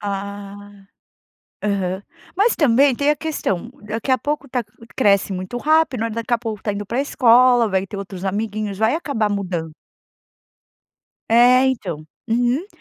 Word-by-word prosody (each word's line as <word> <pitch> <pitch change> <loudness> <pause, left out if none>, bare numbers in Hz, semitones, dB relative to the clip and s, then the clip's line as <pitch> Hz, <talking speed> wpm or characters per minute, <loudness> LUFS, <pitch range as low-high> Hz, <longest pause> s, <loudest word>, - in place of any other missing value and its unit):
Ah, 200 0 -7 0.8
aham, 195 -2 -1 0.3
mas 425 +5 +3
também 275 -1 +4
tem 285 +4 +1
a 300 - +1
questão, 240 - -3 0.2
daqui 225 +5 -3
a 260 - +4
pouco 295 -1 -3
tá 250 -1 -1 0.3
cresce 200 -5 +3
muito 185 +5 -5
rápido, 310 -4 +2
olha 230 - -2
daqui 230 +1 -1
a - - 0
pouco 225 -3 -5
tá 210 - -1
indo 205 +1 -4
pra 240 +6 -1
escola, 245 -3 +4
vai 190 -1 0
ter 200 - -8
outros 195 -1 -7
amiguinhos, 210 +1 -2
vai 220 +4 +2
acabar 275 -10 -1
mudando. 180 -5 -3 1.6
É 245 +3 +6
então, 195 - -3 0.2
uhum. 245 - +1
225 Hz, 150 wpm, -20 LUFS, 200-255 Hz, 1.6 s, É